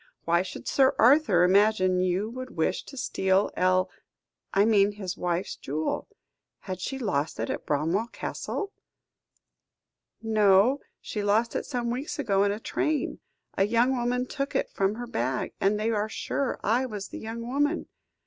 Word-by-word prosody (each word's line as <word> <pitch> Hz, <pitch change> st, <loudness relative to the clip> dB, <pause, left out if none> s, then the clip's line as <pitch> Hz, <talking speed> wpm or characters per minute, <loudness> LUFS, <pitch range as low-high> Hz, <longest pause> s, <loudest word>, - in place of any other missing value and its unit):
Why 170 Hz, +1 st, +3 dB
should 190 Hz, -, -7 dB
Sir 265 Hz, -1 st, +3 dB
Arthur 240 Hz, -, +5 dB
imagine 185 Hz, -1 st, +4 dB
you 185 Hz, +3 st, +1 dB
would 255 Hz, -3 st, -8 dB
wish 160 Hz, -, +1 dB
to 275 Hz, -, -11 dB
steal 190 Hz, -6 st, +1 dB
El 185 Hz, 0 st, +3 dB, 0.6 s
I 200 Hz, +1 st, +4 dB
mean 205 Hz, -2 st, +4 dB
his 190 Hz, -3 st, -5 dB
wife's 175 Hz, +1 st, -2 dB
jewel. 155 Hz, +3 st, -3 dB, 0.5 s
Had 185 Hz, -2 st, -6 dB
she 270 Hz, +7 st, -3 dB
lost 180 Hz, -, -1 dB
it 115 Hz, -, -1 dB
at -, -, -5 dB
Bramwell 165 Hz, +10 st, 0 dB
Castle?" 400 Hz, -, -4 dB, 1.5 s
"No; 215 Hz, +3 st, +4 dB, 0.2 s
she 210 Hz, -, -4 dB
lost 215 Hz, +3 st, +1 dB
it -, -, -2 dB
some 240 Hz, -4 st, -2 dB
weeks 260 Hz, +5 st, -4 dB
ago 200 Hz, -9 st, +2 dB
in 200 Hz, -, +2 dB
a 205 Hz, -, -3 dB
train. 305 Hz, +6 st, -1 dB, 0.4 s
A 195 Hz, -, +3 dB
young 235 Hz, +4 st, +3 dB
woman 250 Hz, +1 st, 0 dB
took 275 Hz, +2 st, -4 dB
it -, -, 0 dB
from 195 Hz, +2 st, 0 dB
her 245 Hz, +2 st, -5 dB
bag; 130 Hz, -, -2 dB
and 205 Hz, +2 st, +2 dB
they 220 Hz, +2 st, 0 dB
are 215 Hz, 0 st, 0 dB
sure 270 Hz, +4 st, -2 dB
I 245 Hz, +5 st, +2 dB
was 205 Hz, -4 st, -6 dB
the -, -, -7 dB
young 230 Hz, +1 st, -6 dB
woman. 290 Hz, +6 st, 0 dB
210 Hz, 165 wpm, -27 LUFS, 185-245 Hz, 1.5 s, Arthur